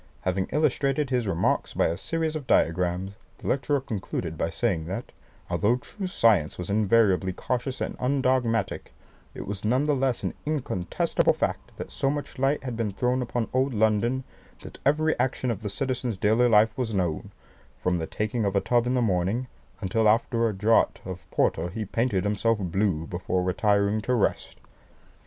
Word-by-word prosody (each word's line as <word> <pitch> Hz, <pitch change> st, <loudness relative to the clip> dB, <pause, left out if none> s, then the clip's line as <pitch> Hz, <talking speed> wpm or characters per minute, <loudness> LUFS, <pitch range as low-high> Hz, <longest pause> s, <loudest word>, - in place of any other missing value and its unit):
Having 95 Hz, 0 st, -1 dB
illustrated 145 Hz, -2 st, +1 dB
his 125 Hz, -4 st, +1 dB
remarks 85 Hz, -3 st, 0 dB
by -, -, +3 dB
a 80 Hz, -, 0 dB
series 160 Hz, -, -2 dB
of 145 Hz, -4 st, -5 dB
diagrams, 90 Hz, +3 st, +1 dB, 0.3 s
the -, -, -14 dB
lecturer 140 Hz, +1 st, +1 dB
concluded 95 Hz, -, -4 dB
by 80 Hz, -, -1 dB
saying 90 Hz, -6 st, -1 dB
that, 100 Hz, +7 st, -5 dB, 0.4 s
although 110 Hz, +4 st, +2 dB
true 190 Hz, +10 st, -6 dB
science 110 Hz, -, +3 dB
was 90 Hz, +2 st, -4 dB
invariably 100 Hz, -3 st, +3 dB
cautious 125 Hz, +7 st, -3 dB
and -, -, -3 dB
undogmatic, 125 Hz, -4 st, 0 dB, 0.4 s
it -, -, -6 dB
was 100 Hz, -1 st, -5 dB
none 125 Hz, +7 st, +2 dB
the 150 Hz, -, +2 dB
less 130 Hz, -2 st, 0 dB
an -, -, -1 dB
incontestable 130 Hz, -, 0 dB
fact -, -, -2 dB
that -, -, -7 dB
so 135 Hz, -, 0 dB
much 145 Hz, -1 st, -4 dB
light 135 Hz, +2 st, +1 dB
had 125 Hz, -3 st, -4 dB
been 115 Hz, -2 st, -1 dB
thrown 125 Hz, +6 st, 0 dB
upon 120 Hz, -1 st, -2 dB
old 130 Hz, 0 st, +1 dB
London, 110 Hz, +4 st, +2 dB, 0.4 s
that -, -, -11 dB
every 155 Hz, +3 st, +3 dB
action 130 Hz, -1 st, 0 dB
of 110 Hz, -, -4 dB
the 105 Hz, -, -3 dB
citizens' 125 Hz, -1 st, -2 dB
daily 110 Hz, +5 st, +3 dB
life 110 Hz, 0 st, +4 dB
was 115 Hz, -4 st, -1 dB
known, 85 Hz, -5 st, -1 dB, 0.5 s
from 90 Hz, +7 st, 0 dB
the 80 Hz, -, -3 dB
taking 110 Hz, +2 st, -2 dB
of 100 Hz, -1 st, 0 dB
a -, -, +5 dB
tub 120 Hz, +3 st, +1 dB
in 125 Hz, -, +1 dB
the 125 Hz, -, +2 dB
morning, 100 Hz, +4 st, 0 dB, 0.4 s
until 110 Hz, +3 st, +2 dB
after 115 Hz, +1 st, +2 dB
a -, -, -1 dB
draught 105 Hz, +4 st, +2 dB
of 90 Hz, -2 st, -8 dB
porter 85 Hz, +2 st, +1 dB
he 110 Hz, +4 st, -4 dB
painted 105 Hz, -2 st, 0 dB
himself 105 Hz, +2 st, +1 dB
blue 95 Hz, -3 st, 0 dB
before 90 Hz, +1 st, -2 dB
retiring 100 Hz, +3 st, +2 dB
to 125 Hz, +4 st, 0 dB
rest." 110 Hz, -, 0 dB
110 Hz, 175 wpm, -26 LUFS, 95-130 Hz, 0.5 s, a